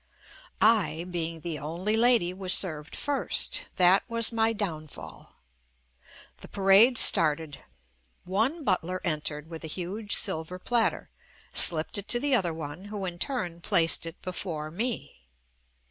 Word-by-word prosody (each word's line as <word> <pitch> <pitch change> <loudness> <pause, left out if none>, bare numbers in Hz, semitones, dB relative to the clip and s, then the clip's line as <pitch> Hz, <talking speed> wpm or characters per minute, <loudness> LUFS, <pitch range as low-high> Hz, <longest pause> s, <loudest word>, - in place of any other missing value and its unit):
I, 205 -7 +2
being 165 -2 -4
the 165 -2 -5
only 170 +8 -3
lady, 230 -6 +2
was 185 -1 +3
served 155 -5 -1
first. 285 -1 0
That 185 +1 +4
was 230 0 0
my 225 0 +1
downfall. 155 - -7 1.0
The - - -13
parade 200 +6 +5
started. 155 -5 +3 0.6
One 225 - -2
butler 185 - -1
entered 150 -2 -3
with 165 -1 -9
a - - -5
huge 195 +6 -2
silver 180 -1 -1
platter, 230 +4 -1 0.4
slipped 165 +4 +4
it 200 - -9
to 240 - +4
the 285 +1 0
other 185 -9 +1
one, 160 +3 -8
who 205 -1 -6
in 175 -1 -6
turn 180 -11 -4
placed 165 -3 +2
it 165 - -9
before 165 -4 -6
me. 220 - -4
180 Hz, 135 wpm, -26 LUFS, 160-215 Hz, 1.0 s, parade